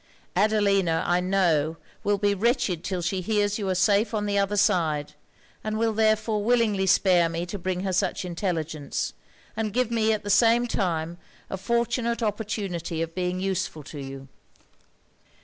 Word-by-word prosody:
Adelina, 200 -4 +2
I 175 +1 +2
know, 170 -4 +1 0.3
will 205 0 +2
be 205 0 +2
wretched 215 - 0
'till 185 -3 -3
she 185 +2 -1
hears 205 +1 0
you 200 -2 -2
are 185 - +1
safe 205 +4 +2
on 210 -1 -1
the 205 -1 -1
other 200 +1 +1
side; 160 -8 +1 0.5
and 215 0 -2
will 225 0 +1
therefore 215 -1 +1
willingly 215 -4 +2
spare 180 -3 +4
me 165 +1 -3
to 195 +3 -6
bring 180 0 -2
her 190 -1 -2
such 185 0 0
intelligence; 165 -4 -3 0.4
and 215 -2 -2
give 250 -1 +1
me 220 -1 +2
at 215 -1 -1
the 205 - -1
same 230 +3 +5
time 170 -6 -2 0.3
a - - -1
fortunate 235 +2 0
opportunity 195 -6 -2
of 165 0 -6
being 180 0 -2
useful 185 -5 -2
to 145 +1 -9
you.' 135 0 -8
195 Hz, 165 wpm, -26 LUFS, 175-215 Hz, 0.5 s, same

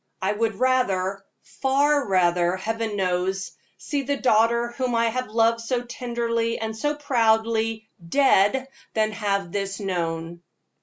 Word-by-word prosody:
I 190 +1 0
would 220 0 -1
rather 200 -7 +1 0.2
far 280 +1 +1
rather, 175 -2 +2
Heaven 225 +2 -3
knows 190 0 -1 0.3
see 285 -3 -2
the 280 +1 -2
daughter 235 -1 +3
whom 245 0 -2
I 230 0 +2
have 255 +2 -3
loved 230 +1 +2
so 240 +1 -2
tenderly 235 -1 -2
and 220 0 -4
so 295 +6 -1
proudly, 225 -4 +1 0.2
dead, 265 0 +3 0.3
than 215 -1 +2
have 200 -4 -2
this 195 0 -3
known." 170 -3 -3
225 Hz, 135 wpm, -24 LUFS, 195-245 Hz, 0.3 s, daughter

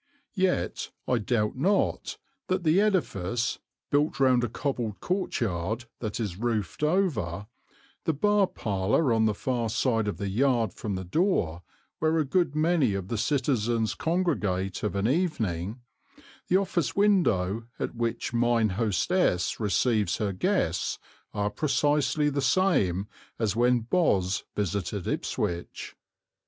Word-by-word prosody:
Yet 185 - 0 0.2
I 125 - +2
doubt 105 0 0
not 190 +10 0 0.3
that 185 -1 0
the 165 +4 +4
edifice, 120 - 0 0.3
built 145 +1 +1
round 130 -2 +4
a 120 - 0
cobbled 115 -6 -3
courtyard 115 - -2
that 110 -2 -4
is 100 -5 -3
roofed 110 - -2
over, 145 - 0 0.6
the 160 - +2
bar 205 +6 +3
parlour 105 - 0
on 110 -1 +3
the 105 -1 +1
far 120 -1 -1
side 115 -1 +1
of 105 - -2
the 100 - -3
yard 115 -2 +1
from 105 -3 -4
the 95 - -4
door, 90 - 0 0.4
where 160 +1 +2
a 155 - +2
good 170 0 +1
many 155 - +2
of 95 -1 -4
the 115 - -1
citizens 120 -5 +1
congregate 110 - -1
of 105 - -2
an 100 +2 +1
evening, 115 - -1 0.7
the 185 - +4
office 185 -5 -1
window 115 - +2
at - - -3
which 115 0 -2
mine 120 -2 +2
hostess 105 - +1
receives 105 -2 +1
her 100 -2 -1
guests, 90 - 0 0.3
are 105 -1 -1
precisely 150 +2 +1
the 140 0 -1
same 120 - +2 0.3
as 110 -3 0
when 120 +1 +3
Boz 110 - +1
visited 100 -1 -2
Ipswich. 85 0 -3
120 Hz, 135 wpm, -27 LUFS, 100-155 Hz, 0.7 s, the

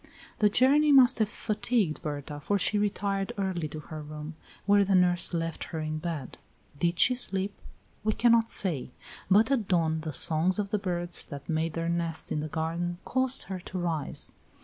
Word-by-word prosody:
The 210 - +5
journey 285 +7 +4
must 260 -3 +6
have 215 -2 +2
fatigued 215 -6 -1
Berta, 145 -1 -5
for 200 +8 0
she 205 +2 +1
retired 200 -1 -1
early 185 -5 -2
to 155 +1 -7
her 155 0 -8
room, 150 +1 -8 0.3
where 205 0 +5
the 195 0 +2
nurse 180 -1 +4
left 165 -2 -3
her 160 - -5
in 155 0 -3
bed. 155 -5 -5 0.4
Did 170 +2 +1
she 250 - +6
sleep? 200 -5 -1 0.5
We 215 0 +1
cannot 230 -1 +3
say; 165 -11 -1 0.4
but 215 +6 +4
at 230 -8 +1
dawn 160 -3 +1
the 155 0 -4
songs 165 +6 +1
of 205 -1 -2
the 210 - +1
birds 175 -2 +1
that 140 -2 -9
made 160 0 -1
their 165 0 -2
nests 170 -1 -3
in 150 - 0
the 155 - -3
garden 165 +3 -3
caused 260 0 +2
her 190 -1 -6
to 185 +1 -7
rise. 165 -5 -2
175 Hz, 185 wpm, -28 LUFS, 160-205 Hz, 0.5 s, must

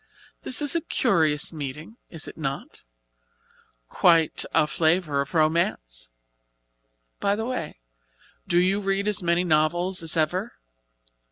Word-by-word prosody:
"This 265 - -1
is 290 - +2
a 335 - +1
curious 160 - +1
meeting, 150 - -7
is 165 -3 -7
it - - -9
not? 140 -3 -5 1.1
quite 165 - +3
a 160 - +3
flavor 160 -2 +1
of 140 +2 -6
romance! - - 0 1.1
By 200 0 +1
the 220 +1 -3
way, 165 - -5 0.7
do 175 - +1
you 185 +3 +3
read 195 +1 -1
as 210 -1 +2
many 170 0 +1
novels 175 +3 +1
as 165 0 +1
ever?" 180 +8 0
170 Hz, 125 wpm, -25 LUFS, 155-190 Hz, 1.1 s, quite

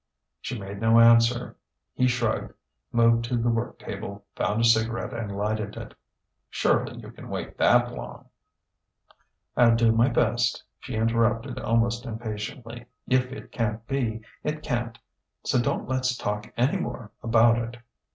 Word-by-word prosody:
She 125 - -5
made 100 0 -7
no 115 +1 +5
answer. 115 +1 +5 0.4
He 125 - +2
shrugged, 125 0 -1 0.4
moved 115 0 +4
to 120 +1 -1
the 120 +1 +1
work 115 +1 -2
table, 100 0 -7
found 105 - 0
a - - +2
cigarette 115 +2 +2
and 105 -4 -4
lighted 105 0 -2
it. - - -8 0.6
"Surely - - +1
you - - -10
can - - -12
wait - - -5
that - - +4
long - - -8 0.7
" - - -36
"I'll 115 -1 +5
do 115 -1 +4
my 115 +3 +4
best," 120 -1 +1 0.2
she - - -6
interrupted 115 0 +1
almost 115 +2 0
impatiently. 115 +2 -6 0.2
"If 130 0 +2
it 135 - -9
can't 110 -1 -2
be, 115 -5 -2 0.2
it 150 0 -3
can't. 120 -3 -2 0.5
So 125 - +2
don't - - -1
let's 130 -1 0
talk 105 +1 -3
any 130 +10 +2
more 120 - -5
about 115 0 +4
it." 120 +1 -5
115 Hz, 150 wpm, -26 LUFS, 110-120 Hz, 0.7 s, no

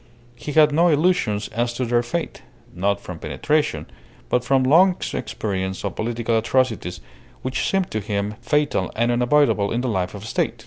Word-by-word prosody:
He 120 +5 -7
had 155 0 +6
no 165 +4 +4
illusions 150 - +2
as 120 +2 -2
to 125 - -1
their 120 0 +2
fate, 165 +8 -4 0.3
not 100 +3 0
from 90 -4 -8
penetration, 150 - -1 0.4
but 125 - +1
from 130 +1 +2
long 175 +7 +5 0.2
experience 95 -2 -3
of 100 - -3
political 115 +1 -1
atrocities, 110 -8 0 0.4
which 130 0 -1
seemed 195 -2 0
to 110 - -1
him 100 0 -2
fatal 150 -10 0
and 120 +2 +1
unavoidable 120 -4 +2
in 120 - 0
the 130 - -1
life 95 -3 -2
of 100 - -8
a - - -8
State. - - -1
120 Hz, 175 wpm, -22 LUFS, 105-145 Hz, 0.4 s, had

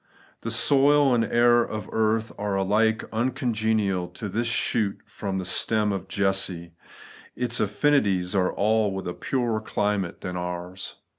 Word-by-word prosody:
The 115 - -4
soil 140 +3 +4
and 115 -1 +2
the - - -5
air 120 0 +4
of 110 -2 -6
earth 110 0 0
are 105 -1 -2
alike 105 +3 +1
uncongenial 110 -6 0
to 95 +4 -7
this 115 +5 -2
shoot 110 -3 0
from 95 -2 -5
the 95 - -3
stem 105 +3 +2
of 95 -1 -4
Jesse. 95 -4 -1 0.6
Its 125 -1 -1
afl&nities 105 -5 +1
are 90 -1 +2
all 110 0 +1
with 95 - -5
a 90 - -3
purer 120 -2 -1
climate 105 -4 -2
than 90 0 -5
ours. 90 +1 -6
105 Hz, 150 wpm, -25 LUFS, 95-115 Hz, 0.6 s, soil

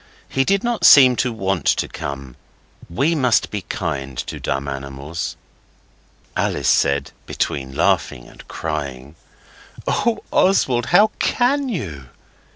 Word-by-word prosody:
He 135 - +1
did 195 +5 +1
not 240 -1 -2
seem 130 -3 +8
to 125 - 0
want 95 -7 -2
to - - +2
come. 70 -3 -7 0.5
We 140 - +1
must 125 -7 +2
be 105 - -3
kind 70 -9 -4
to - - -5
dumb 70 +1 -3
animals.' 70 +3 -5 1.0
Alice - - -1
said, 70 0 +2 0.2
between 65 -1 -3
laughing - - 0
and - - -16
crying 70 -3 -5 0.7
'Oh, 225 0 0
Oswald, 130 -11 +2
how 205 +5 +5
can 270 +2 +1
you! 80 - -5
85 Hz, 125 wpm, -20 LUFS, -, 1.0 s, seem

